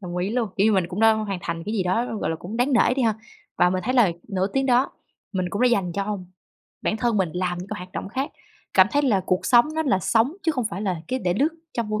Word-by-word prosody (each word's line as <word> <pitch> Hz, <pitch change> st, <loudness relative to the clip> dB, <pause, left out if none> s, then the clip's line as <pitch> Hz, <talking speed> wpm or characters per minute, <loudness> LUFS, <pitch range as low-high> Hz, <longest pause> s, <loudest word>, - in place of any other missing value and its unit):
đồng 175 Hz, -1 st, -5 dB
ý 180 Hz, +3 st, -1 dB
luôn, 230 Hz, -2 st, 0 dB
kiểu 200 Hz, -, +3 dB
như, 220 Hz, -, +4 dB
mình 190 Hz, -4 st, +2 dB
cũng 185 Hz, +3 st, -4 dB
đã 225 Hz, 0 st, +6 dB
hoàn 210 Hz, -3 st, -2 dB
thành 165 Hz, -1 st, -4 dB
cái 215 Hz, -, -3 dB
gì 200 Hz, -, +1 dB
đó, 225 Hz, +6 st, -1 dB
gọi -, -, -1 dB
là, 160 Hz, -, -2 dB
cũng 195 Hz, +7 st, -7 dB
đáng 250 Hz, +4 st, +1 dB
nể 245 Hz, 0 st, +4 dB
đi 265 Hz, -, +1 dB
ha, 225 Hz, -3 st, +2 dB, 0.4 s
và 180 Hz, 0 st, +5 dB
mình 185 Hz, 0 st, -1 dB
thấy 255 Hz, -, 0 dB
là 220 Hz, -9 st, +5 dB, 0.2 s
nửa 190 Hz, -2 st, 0 dB
tiếng 270 Hz, 0 st, +1 dB
đó 255 Hz, +1 st, +3 dB, 0.4 s
mình 185 Hz, -2 st, -1 dB
cũng 205 Hz, -, -1 dB
đã 250 Hz, -, +6 dB
dành 195 Hz, -7 st, +1 dB
cho 200 Hz, +2 st, -2 dB, 0.6 s
bản 215 Hz, -, 0 dB
thân 230 Hz, 0 st, 0 dB
mình 190 Hz, -4 st, +1 dB
làm 180 Hz, 0 st, -2 dB
những 180 Hz, +2 st, -7 dB
cái 210 Hz, -, -4 dB
hoạt 180 Hz, +1 st, -10 dB
động -, -, -5 dB
khác, 265 Hz, +6 st, -3 dB, 0.4 s
cảm 190 Hz, -1 st, +7 dB
thấy 290 Hz, -, +3 dB
là 220 Hz, -9 st, +3 dB
cuộc 185 Hz, +1 st, 0 dB
sống 240 Hz, +3 st, +5 dB
nó 320 Hz, -, +1 dB
là 255 Hz, -11 st, +2 dB
sống 230 Hz, -, +1 dB
chứ 325 Hz, -, +1 dB
không 255 Hz, -5 st, -2 dB
phải 195 Hz, -, -4 dB
là 185 Hz, -5 st, -1 dB
cái 260 Hz, -, -1 dB
để 180 Hz, -6 st, 0 dB
lướt 285 Hz, +8 st, +3 dB, 0.3 s
trong 230 Hz, -3 st, -2 dB
vô 215 Hz, 0 st, -1 dB
210 Hz, 290 wpm, -24 LUFS, 185-245 Hz, 0.6 s, cảm